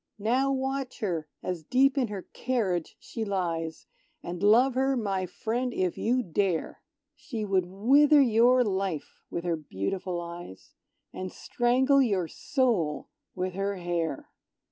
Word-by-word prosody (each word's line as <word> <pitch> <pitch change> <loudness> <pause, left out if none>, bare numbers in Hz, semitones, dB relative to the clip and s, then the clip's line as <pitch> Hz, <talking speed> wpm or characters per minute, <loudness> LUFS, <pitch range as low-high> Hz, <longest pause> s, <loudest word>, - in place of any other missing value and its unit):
Now 250 +6 +1
watch 265 -1 -3
her, 170 -7 -2 0.2
as 180 -3 -3
deep 260 - +3
in 265 -4 +1
her 200 -3 -6
carriage 205 -10 -1
she 225 - -5
lies, 170 -5 -2 0.4
And 175 +1 -5
love 235 +6 +5
her, 265 +1 +1
my 195 -5 -1
friend, 245 +6 -2
if 185 -2 0
you 250 +3 +1
dare! 180 -2 -1 0.3
She 250 -7 -5
would 190 -3 +1
wither 275 +11 +5
your 250 0 +5
life 190 -7 -3
with 170 - -4
her 175 -1 0
beautiful 170 - -3
eyes, 170 - -9 0.4
And 185 -1 -5
strangle 260 +3 +2
your 195 -9 +1
soul 235 - 0 0.3
with 185 -1 -2
her 195 +1 -2
hair! 170 -5 -3
200 Hz, 140 wpm, -28 LUFS, 175-255 Hz, 0.4 s, love